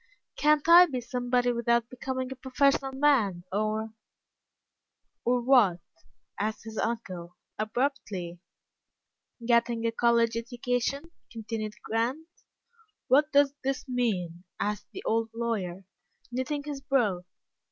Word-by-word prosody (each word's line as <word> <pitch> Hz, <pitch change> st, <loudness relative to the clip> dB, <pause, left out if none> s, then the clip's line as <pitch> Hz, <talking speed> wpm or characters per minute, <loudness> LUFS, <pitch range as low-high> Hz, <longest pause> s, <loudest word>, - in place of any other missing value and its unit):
"Can't 300 Hz, 0 st, +3 dB
I 350 Hz, +1 st, +9 dB
be 260 Hz, -6 st, -3 dB
somebody 245 Hz, 0 st, 0 dB
without 235 Hz, 0 st, +1 dB
becoming 260 Hz, +1 st, -4 dB
a -, -, -4 dB
professional 270 Hz, +1 st, +1 dB
man, 265 Hz, -11 st, +2 dB
or 215 Hz, +2 st, -1 dB, 0.7 s
" -, -, -56 dB
"Or, 245 Hz, +1 st, +2 dB
what?" 235 Hz, -9 st, +5 dB, 0.6 s
asked 215 Hz, +1 st, -2 dB
his 220 Hz, 0 st, -6 dB
uncle, 185 Hz, -7 st, -4 dB, 0.2 s
abruptly. 215 Hz, -7 st, -2 dB, 1.1 s
"Getting 235 Hz, -1 st, +2 dB
a 230 Hz, -, +2 dB
college 235 Hz, 0 st, +2 dB
education?" 245 Hz, +6 st, -2 dB, 0.2 s
continued 220 Hz, -1 st, -5 dB
Grant. 245 Hz, +8 st, -1 dB, 0.8 s
"What 295 Hz, +3 st, +4 dB
does 285 Hz, -1 st, +4 dB
this 270 Hz, +1 st, -2 dB
mean?" 190 Hz, -9 st, -1 dB, 0.2 s
asked 210 Hz, 0 st, -2 dB
the 385 Hz, -, -8 dB
old 225 Hz, 0 st, +1 dB
lawyer, 195 Hz, -6 st, -3 dB, 0.5 s
knitting 285 Hz, +4 st, -2 dB
his 290 Hz, -2 st, -6 dB
brow. 240 Hz, -11 st, +1 dB
235 Hz, 115 wpm, -28 LUFS, 215-270 Hz, 1.1 s, I